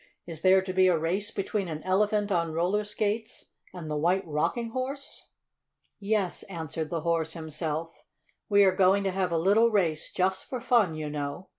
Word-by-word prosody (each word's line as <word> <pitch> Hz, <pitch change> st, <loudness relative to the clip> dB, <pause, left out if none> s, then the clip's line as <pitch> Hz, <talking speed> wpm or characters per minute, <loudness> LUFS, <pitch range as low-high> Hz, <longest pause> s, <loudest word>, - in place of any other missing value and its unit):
"Is 165 Hz, -2 st, -7 dB
there 190 Hz, +1 st, +5 dB
to 185 Hz, -1 st, -4 dB
be 185 Hz, 0 st, +4 dB
a 180 Hz, -2 st, +3 dB
race 185 Hz, +7 st, -1 dB
between 195 Hz, -1 st, -2 dB
an 155 Hz, -2 st, -6 dB
Elephant 205 Hz, +2 st, +1 dB
on 170 Hz, -3 st, 0 dB
roller 180 Hz, +6 st, +1 dB
skates 210 Hz, +1 st, -3 dB, 0.2 s
and 175 Hz, -4 st, -8 dB
the 150 Hz, -, -3 dB
White 180 Hz, +6 st, +1 dB
Rocking 225 Hz, +10 st, -1 dB
Horse?" 265 Hz, +3 st, -5 dB, 0.7 s
"Yes," 200 Hz, -3 st, -1 dB
answered 160 Hz, -3 st, -4 dB
the 165 Hz, -2 st, -2 dB
Horse 165 Hz, -1 st, 0 dB
himself, 160 Hz, 0 st, -4 dB, 0.6 s
"we 205 Hz, -1 st, +6 dB
are 190 Hz, -1 st, +4 dB
going 195 Hz, +1 st, +4 dB
to 195 Hz, -, 0 dB
have 185 Hz, -1 st, -1 dB
a 165 Hz, -, +1 dB
little 205 Hz, +7 st, +4 dB
race, 170 Hz, -8 st, 0 dB
just 190 Hz, 0 st, -1 dB
for 255 Hz, -, -3 dB
fun, 230 Hz, -9 st, +2 dB
you 155 Hz, -1 st, -4 dB
know. 145 Hz, +5 st, -5 dB
185 Hz, 180 wpm, -28 LUFS, 165-205 Hz, 0.7 s, we